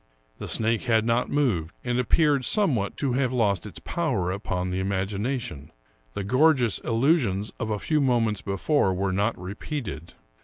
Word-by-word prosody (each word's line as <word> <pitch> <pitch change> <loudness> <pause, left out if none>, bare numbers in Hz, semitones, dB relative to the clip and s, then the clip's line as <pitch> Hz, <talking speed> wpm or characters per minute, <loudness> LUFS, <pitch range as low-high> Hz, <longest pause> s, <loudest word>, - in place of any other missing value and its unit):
The - - -5
snake 115 0 0
had 110 -2 +2
not 120 +1 +1
moved, 105 - 0
and 120 0 0
appeared 145 +2 +3
somewhat 130 - +1
to 135 -4 0
have 130 -1 +1
lost 105 -6 +1
its 95 - -9
power 120 - -1
upon 90 -2 -3
the 90 - -1
imagination; 100 - -3 0.4
the 100 - -2
gorgeous 130 0 +3
illusions 115 - +1
of 110 - -3
a 105 - 0
few 150 +8 0
moments 115 -6 +1
before 100 +1 +1
were 95 0 -1
not 100 +4 0
repeated. 95 - -6
110 Hz, 155 wpm, -25 LUFS, 95-130 Hz, 0.4 s, appeared